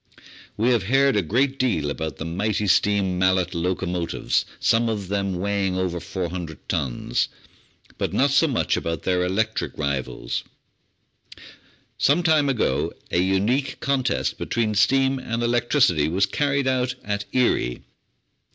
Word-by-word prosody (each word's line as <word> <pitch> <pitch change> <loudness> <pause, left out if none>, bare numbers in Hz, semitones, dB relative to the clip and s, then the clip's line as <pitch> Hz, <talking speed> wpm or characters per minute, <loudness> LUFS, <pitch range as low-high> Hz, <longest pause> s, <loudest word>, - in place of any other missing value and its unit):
We 115 +4 +2
have 120 -3 +3
heard 135 +6 +3
a 105 - +3
great 130 - 0
deal 80 - +1
about 80 -1 -4
the 80 - -5
mighty 100 +5 -1
steam 100 -1 +2
Mallet 95 -1 +2
locomotives, 85 0 -1
some 115 +1 +2
of 100 -4 -3
them 100 -2 -1
weighing 95 0 -1
over 90 -2 -1
400 85 -2 -5
tons, - - -1 0.7
but - - -1
not 140 +1 +2
so 140 +4 +4
much 130 -6 0
about 80 -1 -3
their 90 -1 +1
electric 110 +5 -1
rivals. 70 -4 -3 1.6
Some 150 +6 +3
time 155 -4 +3
ago 130 -5 0 0.2
a 85 - +2
unique 105 +9 +1
contest 135 -2 0
between 115 -2 -1
steam 135 +5 +3
and 115 -2 -3
elec 120 0 0
tricity 85 - +3
was 95 +4 +2
carried 140 +5 0
out 125 -1 0
at 100 0 -3
Erie. 120 - +1
100 Hz, 140 wpm, -23 LUFS, 90-125 Hz, 1.6 s, so